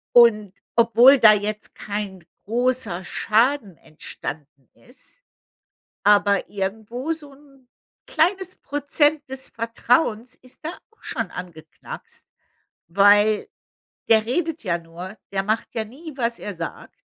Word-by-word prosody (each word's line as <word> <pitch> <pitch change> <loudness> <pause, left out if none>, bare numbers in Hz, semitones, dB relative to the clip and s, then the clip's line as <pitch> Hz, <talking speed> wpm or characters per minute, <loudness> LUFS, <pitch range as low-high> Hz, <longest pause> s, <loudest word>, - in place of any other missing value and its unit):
Und 215 -5 +6 0.2
obwohl 235 +4 +7
da 215 -3 +8
jetzt 210 +1 -3
kein 200 -4 -5 0.2
großer 235 -5 0
Schaden 225 - +1
entstanden 145 -2 -9 0.2
ist, 265 - -14 0.8
aber 205 -1 +3
irgendwo 220 +9 -3
so 295 -3 -9
'n 275 -3 -22 0.4
kleines 370 +2 0
Prozent 290 +1 0
des 265 0 -5
Vertrauens 230 +1 0
ist 255 -1 -18
da 315 - -2 0.2
auch 445 - -32
schon 230 -8 -3
angeknackst, 175 -3 -10 0.6
weil 205 +3 +4 0.6
der 220 -1 +5
redet 320 +5 -2
ja 170 -4 0
nur, 170 +4 -9 0.2
der 195 0 -1
macht 215 +2 -2
ja 225 - 0
nie, 300 +8 -11
was 235 -1 -1
er 205 -3 -6
sagt. 165 0 -7
225 Hz, 120 wpm, -23 LUFS, 200-265 Hz, 0.8 s, da